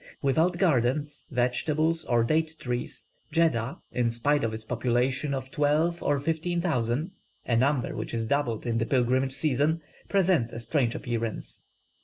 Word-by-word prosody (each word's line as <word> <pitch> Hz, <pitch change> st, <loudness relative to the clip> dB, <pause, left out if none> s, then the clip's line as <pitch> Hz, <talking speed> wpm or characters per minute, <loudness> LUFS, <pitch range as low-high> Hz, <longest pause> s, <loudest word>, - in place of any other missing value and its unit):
Without 160 Hz, +6 st, +2 dB
gardens, 145 Hz, -3 st, +1 dB
vegetables, 150 Hz, +6 st, +1 dB
or 120 Hz, -1 st, +2 dB
date 160 Hz, +5 st, +1 dB
trees, 120 Hz, -1 st, -4 dB, 0.3 s
Jeddah, 140 Hz, -7 st, +1 dB
in 120 Hz, -1 st, +1 dB
spite 140 Hz, +5 st, +1 dB
of 115 Hz, -, 0 dB
its 110 Hz, 0 st, -5 dB
population 125 Hz, +4 st, 0 dB
of 130 Hz, -1 st, -4 dB
twelve 155 Hz, +4 st, +1 dB
or 145 Hz, -1 st, +1 dB
fifteen 165 Hz, +4 st, -1 dB
thousand 145 Hz, -, 0 dB, 0.3 s
(a 115 Hz, -, +1 dB
number 130 Hz, +2 st, +1 dB
which -, -, -4 dB
is 115 Hz, -1 st, -1 dB
doubled 120 Hz, -3 st, -1 dB
in 115 Hz, -1 st, 0 dB
the 115 Hz, -, +1 dB
pilgrimage 130 Hz, +1 st, +2 dB
season) 150 Hz, +3 st, +1 dB, 0.3 s
presents 180 Hz, -, +2 dB
a 115 Hz, -, -5 dB
strange 120 Hz, -1 st, 0 dB
appearance. 115 Hz, -2 st, -4 dB
135 Hz, 150 wpm, -27 LUFS, 120-155 Hz, 0.3 s, Without